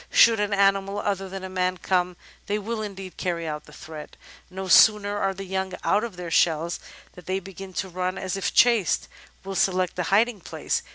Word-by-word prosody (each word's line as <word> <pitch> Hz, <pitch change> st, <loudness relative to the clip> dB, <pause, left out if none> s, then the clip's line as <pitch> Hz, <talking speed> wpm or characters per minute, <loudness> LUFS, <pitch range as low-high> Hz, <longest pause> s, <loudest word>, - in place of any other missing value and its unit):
Should 230 Hz, -2 st, +6 dB
an 210 Hz, 0 st, 0 dB
animal 195 Hz, 0 st, +2 dB
other 195 Hz, -2 st, -2 dB
than 190 Hz, 0 st, -7 dB
a -, -, -4 dB
man 185 Hz, 0 st, -1 dB
come, 180 Hz, 0 st, 0 dB, 0.3 s
they 205 Hz, -, 0 dB
will 215 Hz, +2 st, -4 dB
indeed 195 Hz, -3 st, -7 dB
carry 170 Hz, -2 st, -2 dB
out 150 Hz, -1 st, -5 dB
the -, -, -15 dB
threat. 155 Hz, 0 st, -10 dB, 0.3 s
No 190 Hz, +1 st, -6 dB
sooner 205 Hz, +2 st, +6 dB
are 195 Hz, -1 st, 0 dB
the 195 Hz, +1 st, -6 dB
young 190 Hz, 0 st, -3 dB
out 205 Hz, +3 st, +2 dB
of 230 Hz, -5 st, -5 dB
their 175 Hz, -2 st, -6 dB
shells 165 Hz, +1 st, +2 dB, 0.3 s
than 180 Hz, -, -14 dB
they 190 Hz, +1 st, -1 dB
begin 195 Hz, 0 st, -10 dB
to 190 Hz, -, -2 dB
run, 185 Hz, +1 st, -3 dB
and 190 Hz, 0 st, -3 dB
if 195 Hz, -, -1 dB
chased, 230 Hz, -7 st, +3 dB, 0.4 s
will 195 Hz, 0 st, -5 dB
select 185 Hz, -1 st, +1 dB
a -, -, +1 dB
hiding 215 Hz, +3 st, +3 dB
place. -, -, -2 dB
190 Hz, 205 wpm, -25 LUFS, 180-200 Hz, 0.4 s, Should